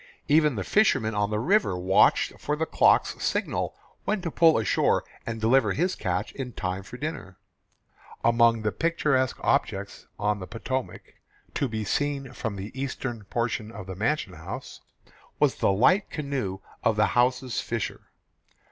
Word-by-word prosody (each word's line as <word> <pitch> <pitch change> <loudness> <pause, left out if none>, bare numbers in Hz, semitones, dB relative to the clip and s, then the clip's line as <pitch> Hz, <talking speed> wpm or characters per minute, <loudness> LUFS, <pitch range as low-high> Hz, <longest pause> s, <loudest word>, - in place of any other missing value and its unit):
Even 150 -2 +4
the 100 - -2
fisherman 110 - +2
on 105 -1 0
the 105 - -1
river 155 - +2
watched 95 +2 +4
for 150 - -1
the 160 +2 -1
cook's - - +3
signal - - -1 0.3
when 215 - 0
to 165 - -2
pull 165 0 +5
in 110 - 0
shore - - +2 0.2
and 115 -1 -3
deliver 110 -2 +3
his 180 +4 0
catch - - -2
in 125 -3 -6
time 95 0 -3
for 100 +6 -10
dinner. 130 - -5 0.9
Among 115 -1 +4
the 105 - +1
picturesque 145 -5 +1
objects - - -1
on 105 0 0
the 95 - -7
Potomac, 125 +5 -5 0.4
to 140 - 0
be 110 -2 -3
seen 140 +4 -1
from 110 -2 -4
the 100 +2 -6
eastern 130 -4 -4
portion 115 0 -2
of 100 -3 -8
the 95 0 -7
mansion 110 -1 -1
house, 80 -1 -8 0.6
was - - +3
the - - +2
light 155 - +3
canoe 130 - -3 0.2
of 115 - +3
the 105 0 +4
house's 125 0 +1
fisher. 115 -3 -4
115 Hz, 160 wpm, -26 LUFS, 105-140 Hz, 0.9 s, pull